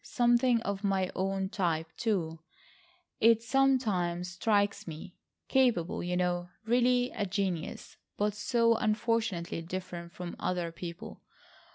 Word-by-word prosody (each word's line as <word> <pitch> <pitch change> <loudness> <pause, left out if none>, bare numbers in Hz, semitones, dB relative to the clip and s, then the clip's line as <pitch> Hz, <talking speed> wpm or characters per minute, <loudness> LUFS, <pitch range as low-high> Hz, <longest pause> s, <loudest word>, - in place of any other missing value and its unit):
Something 240 -1 +3
of 200 0 -3
my 190 -2 +1
own 190 0 -1
type, 165 -5 -1
too, 175 -8 -1 0.8
it 230 0 +5
sometimes 215 -10 +1
strikes 205 +1 +1
me. 165 +3 -8 0.3
Capable, 240 -11 +2
you 180 0 -1
know, 175 -1 0 0.2
really 245 +1 +3
a 205 - -2
genius, 185 -3 -3 0.2
but 210 0 +1
so 230 +2 +2
unfortunately 215 -6 0
different 175 0 -6
from 175 -1 -7
other 175 -2 -1
people. 170 0 -8
195 Hz, 115 wpm, -30 LUFS, 175-230 Hz, 0.8 s, it